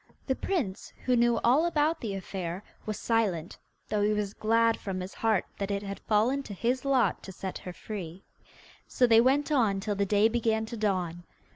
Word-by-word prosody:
The 265 - +1
prince, 260 - -2
who 250 - +3
knew 235 -1 +3
all 260 +7 +5
about 315 0 +1
the 210 -4 -3
affair, 185 -1 -5 0.2
was 215 -2 -2
silent, 200 -8 0 0.3
though 210 -1 0
he 210 +1 +3
was 210 -1 -2
glad 230 +1 +2
from 190 -2 -4
his 185 +1 -6
heart 220 -4 +1
that 200 0 -2
it 200 0 -2
had 200 0 -5
fallen 230 +6 +2
to 210 -7 -8
his 245 +5 0
lot 270 -3 +2
to 190 - -9
set 190 0 -6
her 180 - -7
free. 185 -2 -7 0.6
So 250 - +3
they 230 -1 +6
went 275 +5 +2
on 220 -9 +2
till 205 +2 -2
the 200 0 0
day 205 +2 +4
began 225 -1 0
to 230 +2 -7
dawn. 185 -5 -1
215 Hz, 195 wpm, -29 LUFS, 195-240 Hz, 0.6 s, they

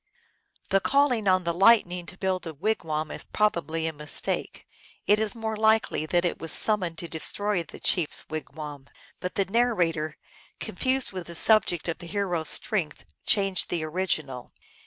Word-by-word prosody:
The 195 - +3
calling 255 -3 +2
on 185 -1 +3
the 170 0 -1
Lightning 180 -2 +3
to 180 - -10
build 185 -2 -2
a 160 - -7
wigwam 155 -4 -2
is - - -3
probably 170 -6 -1
a 160 - -2
mistake. 150 0 -1 0.4
It 210 +1 +4
is 220 +1 -2
more 220 -1 -3
likely 220 -7 +2
that 175 +2 +1
it 175 - -2
was 165 - 0
sum 215 -1 +6
moned 170 -3 -5
to 170 - -6
destroy 200 +4 -1
the 165 - -11
chief 175 -5 +2
s - - -6
wigwam, 150 -2 -7 0.3
but 180 - -5
the 195 - +1
narra 215 -5 +1
tor, 155 -1 -5 0.4
confused 260 0 0
with 185 -3 -7
the 170 - -8
subject 175 -4 +3
of 170 - -3
the 175 - -9
hero 190 -3 -1
s 160 - -2
strength, 185 -8 0
changed 195 -3 +1
the 170 -2 -2
original. 155 -6 -3
180 Hz, 180 wpm, -26 LUFS, 160-210 Hz, 0.4 s, sum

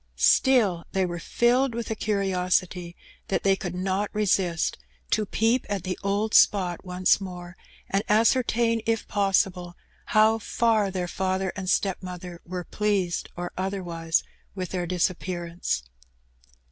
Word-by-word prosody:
Still, 215 -11 +4
they 190 -1 +2
were 175 -1 -4
filled 240 +6 +2
with 235 -1 -4
a - - -1
curiosity 185 -4 0 0.3
that 195 - -1
they 195 -1 +4
could 180 -2 -5
not 190 +2 -1
resist 190 -5 +1 0.3
to 215 -1 +1
peep 225 +5 +1
at 200 -4 -2
the 185 0 -2
old 205 +2 0
spot 180 -4 +4
once 185 +1 +2
more, 180 -2 -8 0.3
and 195 +1 +1
ascertain, 230 +1 +3
if 225 -1 0
possible, 190 -3 0 0.3
how 220 0 +4
far 220 -2 +1
their 180 -2 -3
father 190 +1 -1
and 190 -2 -4
stepmother 180 -3 -2
were 180 0 -4
pleased 195 -3 -1
or 175 0 -4
otherwise 175 -4 -1 0.3
with 185 -3 -4
their 180 -2 -3
disappearance. 175 - -2
190 Hz, 135 wpm, -26 LUFS, 180-210 Hz, 0.3 s, Still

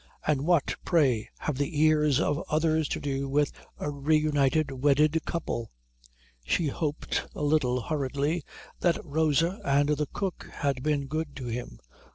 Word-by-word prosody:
"And 150 -3 +2
what, 170 -5 +3
pray, 135 - +2
have 145 -3 -3
the 145 +1 -1
ears 150 -3 +4
of 150 0 0
others 155 0 +2
to - - -2
do 140 -1 -2
with 145 +1 +2 0.3
a 145 - -3
reunited 145 0 +2
wedded 145 +4 +3
couple?" 155 -9 -3 0.7
She 150 - +1
hoped, 150 +1 -2
a - - -4
little 145 -4 +2
hurriedly, 145 +3 -1 0.4
that 175 -2 +2
Rosa 160 +4 +1
and 140 +1 +2
the 150 0 +1
cook 195 -3 -4
had 140 -4 -1
been 145 -1 0
good 155 +1 -3
to 130 -3 -6
him. 120 - -5
145 Hz, 150 wpm, -28 LUFS, 140-155 Hz, 0.7 s, ears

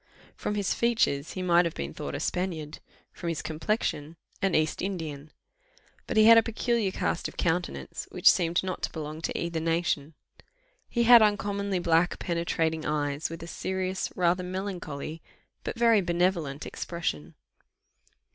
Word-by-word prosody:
From 210 - -3
his 200 -2 0
features, 220 -11 +1
he 185 - -4
might 175 -1 +5
have 170 -2 -3
been 70 +1 -4
thought - - -5
a - - -3
Spaniard 160 -5 -3 0.3
from 170 - -4
his 165 - -3
complexion, 160 -2 -2 0.3
an 195 -3 +2
East 155 -1 +1
Indian; 155 -6 -4 0.8
but - - -2
he 215 - +7
had 230 0 +9
a - - +4
peculiar 230 -1 0
cast 180 - -1
of - - -12
countenance, 165 - -2
which - - 0
seemed 170 0 +4
not 185 -1 -4
to - - -2
belong 155 0 -6
to - - -2
either 170 -1 -2
nation. 165 -2 -1 0.7
He 235 - +1
had 235 0 +9
uncommonly 200 -2 +1
black 170 0 +2
penetrating 165 -2 -1
eyes, 145 0 -1
with 165 0 -7
a - - -7
serious, 185 +1 -3
rather 180 0 +2
melancholy, 180 -5 -5 0.4
but - - -4
very 230 -3 +5
benevolent 170 -5 0
expression. 80 - -4
170 Hz, 155 wpm, -28 LUFS, 155-190 Hz, 0.8 s, had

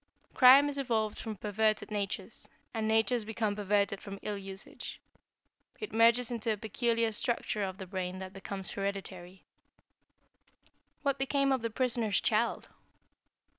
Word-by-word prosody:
Crime 270 +3 +8
is 285 -1 -3
evolved 225 -5 -1
from 220 -2 -5
perverted 215 +1 0
natures, 205 -1 -4 0.2
and 220 -2 -1
natures 225 +2 +2
become 215 -1 -2
perverted 200 -1 +1
from 200 -1 -7
ill 210 - -2
usage. 195 0 -8 0.8
It 430 - -6
merges 230 +2 +4
into 230 -1 -1
a 215 - -1
peculiar 230 +2 0
structure 215 -1 -1
of 190 -1 -3
the 190 - -7
brain 185 0 -4
that 190 0 -7
becomes 195 0 -4
hereditary." 190 -2 -5 1.6
"What 280 -2 0
became 275 0 +1
of 260 -2 +1
the 230 - -2
prisoner's 230 -3 +1
child?" 230 +1 0
215 Hz, 135 wpm, -31 LUFS, 200-235 Hz, 1.6 s, Crime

